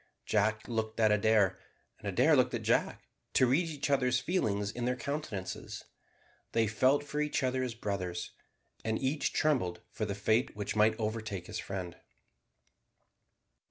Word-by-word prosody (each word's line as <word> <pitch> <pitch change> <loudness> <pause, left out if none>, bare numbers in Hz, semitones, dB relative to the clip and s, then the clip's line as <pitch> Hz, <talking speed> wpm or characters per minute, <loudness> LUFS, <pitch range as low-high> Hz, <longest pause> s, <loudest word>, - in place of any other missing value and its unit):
Jack 110 +1 +1
looked 110 -1 -2
at 110 -1 +5
Adair, 105 -2 +3 0.4
and - - -7
Adair - - +4
looked - - +3
at - - -4
Jack, - - +1 0.3
to 130 - +5
read 145 +8 +2
each 145 -2 -2
other's 125 -3 +3
feelings 105 - 0
in 120 +1 -4
their 125 +1 +1
countenances. 125 -9 -5 0.7
They 115 -1 +3
felt 130 +7 +3
for 150 +1 -3
each 150 -2 0
other 130 0 +1
as 125 -3 -3
brothers, 90 -5 -3 0.5
and 110 0 0
each 135 +3 0
trembled 125 - +1
for 110 - -2
the 100 -2 -3
fate 110 +4 +1
which 105 0 -3
might 110 +1 +3
overtake 110 -4 -3
his - - -5
friend. 90 -3 -5
110 Hz, 155 wpm, -31 LUFS, 105-130 Hz, 0.7 s, at